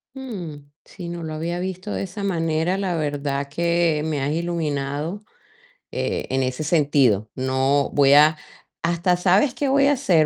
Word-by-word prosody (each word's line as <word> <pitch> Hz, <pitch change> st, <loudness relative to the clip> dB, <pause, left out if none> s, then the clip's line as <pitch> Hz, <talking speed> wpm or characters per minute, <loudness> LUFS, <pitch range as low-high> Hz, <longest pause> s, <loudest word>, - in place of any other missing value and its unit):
Mm, 175 Hz, -, -7 dB, 0.2 s
sí, 175 Hz, -2 st, -9 dB
no 170 Hz, -1 st, -6 dB
lo 155 Hz, -1 st, -5 dB
había 170 Hz, +3 st, -3 dB
visto 185 Hz, +2 st, -4 dB
de -, -, -2 dB
esa 195 Hz, +2 st, -6 dB
manera, 165 Hz, -1 st, 0 dB
la 190 Hz, -3 st, -1 dB
verdad 140 Hz, -2 st, -2 dB
que 170 Hz, -1 st, +1 dB
me 150 Hz, -3 st, -1 dB
has 140 Hz, +2 st, 0 dB
iluminado, 160 Hz, +1 st, -2 dB, 0.7 s
eh, -, -, -2 dB
en 135 Hz, -, +1 dB
ese 130 Hz, +3 st, -2 dB
sentido, 140 Hz, -, +2 dB
no 130 Hz, +2 st, +1 dB
voy 140 Hz, -1 st, +5 dB
a 155 Hz, +1 st, +6 dB, 0.4 s
¿hasta 175 Hz, +1 st, +1 dB
sabes 195 Hz, +8 st, +3 dB
qué 285 Hz, -, -1 dB
voy 275 Hz, +1 st, +4 dB
a 285 Hz, -, +4 dB
hacer?, 190 Hz, -, +3 dB
160 Hz, 165 wpm, -22 LUFS, 145-180 Hz, 0.7 s, a